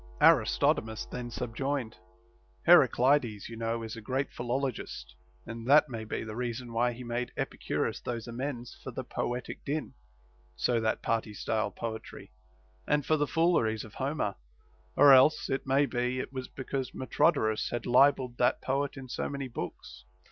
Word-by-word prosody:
Aristodemus 110 0 +3
then 125 -1 -6
subjoined: 125 +1 -3 0.7
Heraclides, 125 -6 +4
you 115 - -7
know, 115 0 -2
is 110 0 -6
a 115 - -8
great 130 +5 -2
philologist; 125 +1 -3 0.3
and 115 +1 -7
that 150 +1 +6
may 115 -3 -5
be - - -3
the 110 -1 -7
reason 120 0 -4
why 120 +1 +2
he 125 +2 -9
made 120 +1 -3
Epicurus - - -2
those 120 -2 -4
amends 125 0 -5
for - - -6
the - - -5
poetic 125 +1 -4
din 150 -1 -3 0.6
(so 120 -2 +1
that 110 0 -1
party 110 -2 -1
style 110 0 -1
poetry) 110 +2 -7 0.6
and 145 -2 +1
for 155 - +3
the 145 -1 0
fooleries 150 -11 +2
of 110 - -12
Homer; 135 -7 -1 0.6
or 140 0 +8
else, 145 +3 +5
it 135 0 -2
may 135 +2 +4
be, 125 -1 -1
it 130 - -5
was 130 -1 -5
be 135 - -8
cause 135 -1 -3
Metrodorus 110 -3 +1
had 120 -1 -4
libelled 125 -1 +4
that 125 - +3
poet 140 +1 -1
in 135 -1 -8
so 125 - -3
many 140 -2 -4
books. 120 - -7
125 Hz, 160 wpm, -30 LUFS, 115-135 Hz, 0.7 s, or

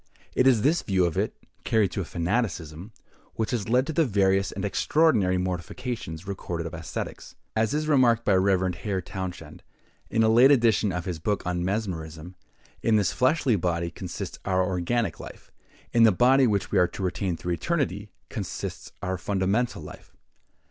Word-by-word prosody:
It 130 - +3
is 120 -5 +4
this 160 +4 +3
view 95 -3 +1
of 85 - -1
it, - - -1 0.3
carried 105 -5 +2
to 100 - -2
a - - -4
fanaticism, 85 -1 -2 0.4
which 110 +3 -2
has 115 -4 -2
led 125 +3 +3
to 160 - -4
the 165 - +3
various 95 -5 +2
and - - -4
extraordinary 100 - +2
mortifications 90 0 -4
recorded 90 -4 -4
of 85 - -6
ascetics. 80 0 -6 0.2
As 110 +5 +1
is 155 0 -1
remarked 120 -6 +3
by 100 - +3
the 95 - +4
Rev. 95 -1 +2
Hare 95 +2 -3
Townshend, 95 0 -7 0.5
in 115 - +2
a - - +4
late 120 +4 +6
edition 115 -6 +3
of 90 -1 -4
his 90 -3 -4
book 100 +5 -1
on 90 0 -1
mesmerism, 90 -4 -4 0.5
in 115 - +3
this 100 -4 +2
fleshly 130 -1 +2
body 85 -2 -1
consists 90 0 -6
our 95 -1 +1
organic 95 +2 -1
life; - - -11 0.4
in 115 - +4
the 115 -1 +7
body 130 +6 +4
which 100 -4 -1
we 100 - +3
are 90 - +4
to 95 - -7
retain 90 -1 -1
through 90 +2 -3
eternity, 105 - -2 0.2
consists - - -6
our 95 -1 -2
fundamental 100 +6 0
life. - - -12
100 Hz, 175 wpm, -26 LUFS, 90-115 Hz, 0.5 s, the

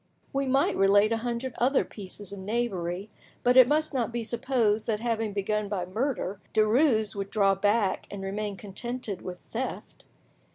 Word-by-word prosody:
We 275 0 0
might 270 +2 +2
relate 200 +2 +4
a 230 - +2
hundred 240 +2 -3
other 260 +3 +3
pieces 200 -1 -8
of 200 - -7
knavery, 195 -3 -2 0.4
but 245 0 +4
it 255 -1 +9
must 305 +2 +1
not 240 -3 0
be 235 0 -2
supposed 230 -2 0
that 215 -2 0
having 225 -2 -1
begun 205 +1 -1
by 190 -4 -2
murder, 205 -1 -2 0.2
Derues 220 -1 +3
would 195 -1 -4
draw 200 -2 +3
back 205 0 +1
and 200 -1 -6
remain 200 +1 -3
contented 210 +1 -5
with 180 -1 -6
theft. 255 +3 -6
215 Hz, 165 wpm, -28 LUFS, 200-240 Hz, 0.4 s, it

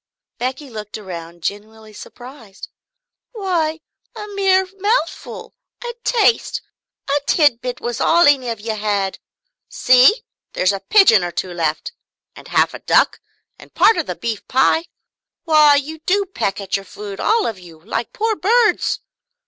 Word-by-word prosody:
Becky 260 +4 -4
looked 215 -4 -8
around 170 -4 -9
genuinely 215 +1 -6
surprised. 240 -3 -12 0.6
"Why 340 -7 -2 0.3
a 420 -2 -7
mere 385 -2 +2
mouthful, 405 -3 -2 0.3
a 475 - -5
taste, 465 -1 +1 0.5
a 285 +1 +1
tidbit, 250 -5 +1
was 240 -1 -4
all 340 +1 +4
any 270 -4 +3
of 230 -2 -4
you 220 +1 -4
had. 205 -2 -2 0.5
See 255 - +4 0.3
there's 185 +2 +1
a 195 - -3
pigeon 305 - +5
or 175 - -2
two 180 +1 -4
left, 160 -3 -2 0.4
and - - -13
half - - +2
a - - -8
duck, - - +2 0.4
and - - -17
part 450 - +5
of - - -2
the - - -4
beef 225 -3 -5
pie 265 +6 +2 0.6
why, 305 -3 +5
you 300 +3 -3
do 400 +2 +2
but 385 - -35
peck 195 0 -2
at 195 -1 -3
your 195 0 -4
food, 200 +1 -9
all 445 -2 +2
of 210 -5 -4
you, 170 -3 -15
like 230 +1 -3
poor 445 0 -1
birds!" 430 +5 +1
255 Hz, 155 wpm, -19 LUFS, -, 0.6 s, pigeon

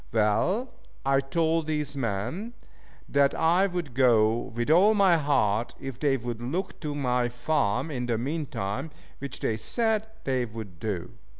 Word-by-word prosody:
Well, 120 - +1 0.3
I 135 0 +4
told 160 +3 0
these 150 -2 -2
men 125 - -3 0.5
that 140 0 +3
I 175 +4 +3
would 175 -8 -4
go 115 -4 +4 0.2
with 120 +5 0
all 200 +7 +6
my 195 -4 +5
heart, 120 -7 +1
if 135 -2 -7
they 140 -3 +2
would 120 -1 -5
look 155 +11 -3
to 150 -3 -4
my 125 -3 +1
farm 125 +1 0
in 125 -3 -3
the 115 -2 +1
mean 145 +6 -2
time, 100 +10 -3 0.3
which 140 -2 -6
they 110 - 0
said 220 - 0 0.2
they 130 -2 0
would 105 -6 -9
do. 90 -4 -3
135 Hz, 160 wpm, -27 LUFS, 115-160 Hz, 0.5 s, all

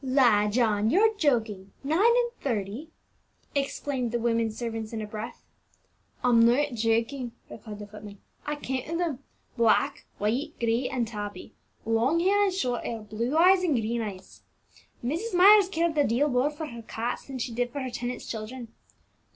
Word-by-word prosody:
"La, 250 -6 +4
John, 215 -1 +2
you're 435 - +4
joking! 225 - 0
nine 310 +5 +1
and 475 +2 +4
thirty!" 230 +4 -3 0.6
exclaimed 275 -3 -2
the 240 - 0
women 230 -1 +1
servants 225 0 -5
in 225 - -3
a 215 - -3
breath. 215 +1 -7 0.8
"I'm 235 -2 +5
not 260 +4 +3
joking," 230 +2 0 0.2
replied 210 -1 -9
the 210 - -8
footman; 205 0 -11 0.3
"I 295 - -2
counted 280 +3 -3
them, 325 -7 -1 0.4
black, 230 -2 +2
white, 225 +8 -1
gray, 235 +2 +1
and 245 -3 -1
tabby, 205 -4 -7 0.3
long 230 +8 +2
hair 400 +4 +3
and 390 - +1
short 250 -10 -1
hair, 230 -1 -4
blue 230 +7 -2
eyes 365 +2 +6
and 325 -6 +2
green 230 0 -1
eyes! 195 -4 -8 0.6
Mrs. 360 - -2
Myers 395 +2 +7
cared 335 -2 0
a 295 - +4
deal 280 +5 +2
more 250 +2 +2
for 300 +1 -6
her 235 -5 -8
cats 225 +1 -4
than 270 -1 -6
she 240 -1 -3
did 245 +1 -1
for 280 - -4
her 260 -1 -4
tenants' 245 +1 -4
children. 230 +2 -6
245 Hz, 165 wpm, -27 LUFS, 225-295 Hz, 0.8 s, Myers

